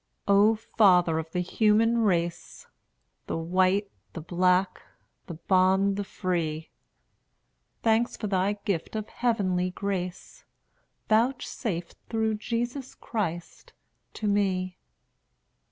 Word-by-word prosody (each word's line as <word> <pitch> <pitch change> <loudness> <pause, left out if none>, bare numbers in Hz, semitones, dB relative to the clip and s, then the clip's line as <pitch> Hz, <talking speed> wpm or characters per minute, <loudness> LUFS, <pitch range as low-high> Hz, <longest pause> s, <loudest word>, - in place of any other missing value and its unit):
O 205 +2 +5
Father 180 -7 +3
of 160 0 -6
the 180 +2 -2
human 220 +5 +2
race! 175 -5 -1 0.6
The - - -2
white, 185 +4 +1 0.2
the 165 - -6
black, 180 +3 +1 0.5
the 170 - -6
bond, 190 +3 +2
the 205 - -2
free, 165 -5 -3 1.1
Thanks 225 +1 +2
for - - -5
thy 195 0 +1
gift 190 0 -2
of 215 -1 -4
heavenly 190 -7 0
grace, 185 -1 -5 0.6
Vouchsafed 220 -6 -1
through 220 -1 0
Jesus 240 +4 -3
Christ 195 - -5 0.4
to 215 - -3
me. 185 -3 0
195 Hz, 105 wpm, -27 LUFS, 180-220 Hz, 1.1 s, O